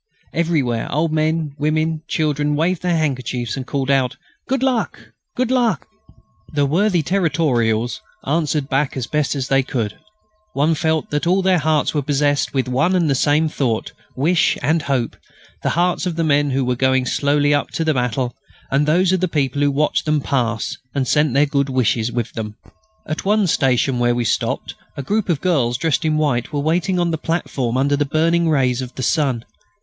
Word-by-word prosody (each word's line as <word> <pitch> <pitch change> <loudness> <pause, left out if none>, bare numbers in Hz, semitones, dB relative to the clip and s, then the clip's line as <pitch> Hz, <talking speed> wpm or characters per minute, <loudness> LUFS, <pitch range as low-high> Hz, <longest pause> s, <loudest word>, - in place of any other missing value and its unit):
Everywhere 145 -9 0
old 155 +2 0
men, 155 -1 0
women 155 +1 +1
and 160 -1 -6
children 150 -1 0
waved 170 +3 0
their 175 -2 +1
handkerchiefs 130 -6 -2
and 135 -1 -6
called 140 -1 -1
out, 130 -2 +1 0.3
"Good 265 0 0
luck!... 255 -3 0 0.4
Good 255 0 0
luck!" 245 -4 +1 0.7
The 145 -1 +2
worthy 175 +3 +2
Territorials 135 - 0 0.2
answered 150 -1 0
back 135 0 0
as 125 - -2
best 150 +2 -1
they 135 0 +3
could. 115 -5 -3 0.5
One 150 +4 +2
felt 160 -1 -1
that 145 +3 -1
all 185 +2 +3
hearts 160 -5 +2
were 150 - +1
possessed 145 0 +1
with 130 -2 -1
one 135 +9 +1
and 170 -5 +2
the - - +4
same 145 +4 +2
thought, 125 -7 -2 0.2
wish, 160 +5 +2
and 160 +2 +2
hope, 135 -5 -1 0.4
the - - 0
hearts 180 +1 +1
of 175 - -2
the 165 - 0
men 145 -2 +2
who 135 -1 0
were 125 0 0
going 130 0 +2
slowly 145 +2 +2
up 145 - 0
to 165 - -1
battle, 125 -1 -1 0.4
and 140 +2 +2
those 175 +4 +3
of 190 - +2
the 185 - +1
people 145 -3 -1
who 145 - +4
watched 145 +2 0
them 155 0 +2
pass 120 -5 -1 0.2
and 135 -2 0
sent 150 -2 +2
their 145 +2 +5
good 140 -1 0
wishes 120 -3 +1
with 120 -2 -3
them. 105 -2 -5 0.5
At 155 - -4
one 210 +1 +2
station 135 -5 +1
where 120 0 +2
we 120 -1 -1
stopped 110 - -1 0.2
a 140 - -4
group 210 +6 -1
of 165 -5 0
girls 130 -10 +1
dressed 130 -1 0
in 155 -1 +1
white 140 -6 0
were 145 - -2
waiting 170 +5 0
on 175 -1 +1
the 160 - -2
platform 135 -7 -2
under 140 +2 +2
the 145 - +1
burning 165 +3 +1
rays 130 -4 +2
of 125 -1 -7
the 130 - -4
sun. 135 -5 0
145 Hz, 190 wpm, -20 LUFS, 130-160 Hz, 0.7 s, their